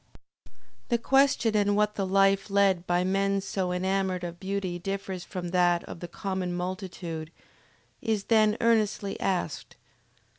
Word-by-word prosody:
The 240 - +3
question 260 -2 +3
in 205 -1 +3
what 210 0 +2
the 195 -2 -2
life 195 +1 +3
led 195 -3 +2
by 175 0 +2
men 195 +1 +1
so 190 -1 -2
enamored 190 0 -1
of 170 0 -6
beauty 190 -2 -3
differs 195 -1 -4
from 180 -2 -5
that 175 -1 +2
of - - -9
the 175 - -6
common 185 0 -3
multitude, 175 -3 -5 0.7
is 220 -4 0
then 215 -1 +3
earnestly 215 -3 +1
asked. 180 -5 -2
195 Hz, 140 wpm, -27 LUFS, 180-200 Hz, 0.7 s, The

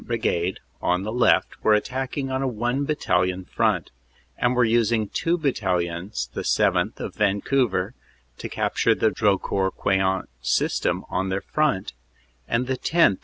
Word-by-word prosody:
Brigade, 85 +2 -1 0.2
on 90 +1 +1
the 105 - -3
left, 120 +1 +2
were 110 - +5
attacking 130 +4 -2
on 130 0 -1
a 135 - 0
one 120 +4 -1
battalion 90 -11 0
front, - - 0 0.4
and 125 +1 +1
were 125 - +4
using 115 -1 +2
two 170 +1 0
battalions 90 - -1
the - - -3
7th., - - +1
of - - -5
Vancouver, 105 0 +1 0.5
to - - -5
capture - - +1
the 110 - +2
Drocourt 95 -1 +1
Queant 95 -1 +1
system 65 - 0
on 95 +1 -1
their 95 +1 -1
front, 145 -11 0 0.5
and 115 +2 0
the 130 0 -2
10th. 165 - +3
105 Hz, 145 wpm, -24 LUFS, 95-130 Hz, 0.5 s, were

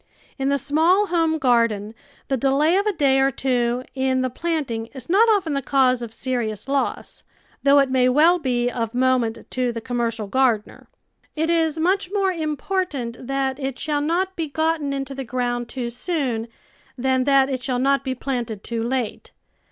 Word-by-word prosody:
In 270 0 0
the 280 - +2
small 320 +9 +3
home 330 -3 +1
garden 230 -6 +1 0.3
the 270 - +1
delay 275 +6 +2
of 400 +2 +1
a - - +3
day 280 -7 +2
or 270 0 +4
two 250 -2 0
in 260 -1 0
the 255 - -1
planting 270 -7 -2
is 255 -2 -8
not 445 +5 +5
often 385 -8 +2
the 275 - 0
cause 255 -2 +2
of 235 -2 -6
serious 225 -3 -3
loss, 275 0 -2 0.4
though 280 0 +5
it 275 -2 +3
may 255 -1 +3
well 320 +7 +4
be 245 -5 0
of 230 -1 -3
moment 250 -3 +1
to 250 -1 0
the 230 - -5
commer 240 0 -1
cial 220 -2 -6
gardener. 235 -2 0 0.5
It 320 +2 0
is 325 -2 +1
much 365 +4 +1
more 395 -2 +1
important 305 -6 -3
that 270 0 -1
it 270 -2 -3
shall 295 -2 -1
not 360 +5 0
be 325 -2 -2
gotten 315 0 -1
into 275 0 -3
the 270 0 -5
ground 245 -1 -2
too 245 -3 -4
soon 245 -4 -2 0.5
than 260 0 +1
that 275 -1 +4
it 260 -2 -3
shall 250 0 -1
not 275 +2 +2
be 260 -1 -2
planted 240 -5 -4
too 230 -1 -3
late. 240 0 -3
265 Hz, 185 wpm, -22 LUFS, 245-310 Hz, 0.5 s, not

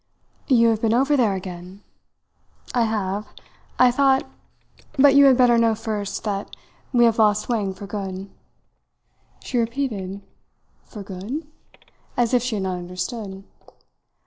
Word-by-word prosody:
"You 235 -4 +5
have 220 -1 0
been 225 0 +2
over 275 +4 +3
there 225 -7 +2
again?" 185 +1 -8 0.9
"I 240 -2 +2
have. 205 -2 -2 0.5
I 250 -1 +6
thought 270 +1 +3 0.7
but 275 0 +6
you 280 0 +7
had 265 -2 +6
better 245 -2 +5
know 230 -1 +3
first 215 -2 -4
that 200 -2 -4 0.4
we 240 -2 +5
have 230 -1 +2
lost 210 -1 +3
Wang 210 -5 0
for 200 - -9
good." 195 -1 -5 1.2
She 250 - -1
repeated 225 -6 -3 0.6
"For 210 -4 -9
good?" 205 - -6 0.7
as 240 0 +1
if 250 - +4
she 245 -2 -2
had 200 - -2
not 185 -1 -2
understood. 190 +3 -6
220 Hz, 140 wpm, -22 LUFS, 195-245 Hz, 1.2 s, you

